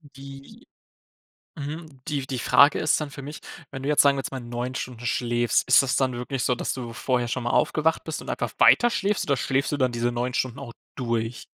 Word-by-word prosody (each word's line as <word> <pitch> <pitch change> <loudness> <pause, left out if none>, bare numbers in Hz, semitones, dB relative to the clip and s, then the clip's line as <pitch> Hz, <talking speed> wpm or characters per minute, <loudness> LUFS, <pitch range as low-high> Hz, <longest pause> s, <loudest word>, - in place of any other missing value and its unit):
Die 140 - -12 0.9
Mhm, 150 -1 -7
die 140 -3 -2
die 130 -2 -4
Frage 140 +4 +5
ist 155 - +2
dann 150 -2 -4
für 140 - -9
mich: 145 +3 -8 0.3
Wenn 135 -1 -7
du 140 - -3
jetzt, 150 - +4
sagen 140 -1 +5
wir - - -1
jetzt - - -5
mal, 135 - -4
9 120 +1 -5
Stunden 120 -2 -6
schläfst, 120 0 0
ist 130 - +7
das 135 - 0
dann 130 -2 +1
wirklich 125 +1 -3
so, 125 - +2
dass - - -3
du 120 -3 -6
vorher 120 0 -1
schon 125 +1 -2
mal 120 - -2
aufgewacht 160 +5 +1
bist 160 - -5
und - - -7
einfach - - -3
weiterschläfst, 210 -4 +3
oder 140 - +3
schläfst 135 +2 0
du 145 - -1
dann 130 -3 +1
diese 120 0 -1
9 120 +1 -2
Stunden 130 0 -2
auch 135 -4 -8 0.2
durch? 115 -2 -3
130 Hz, 225 wpm, -25 LUFS, 120-140 Hz, 0.9 s, ist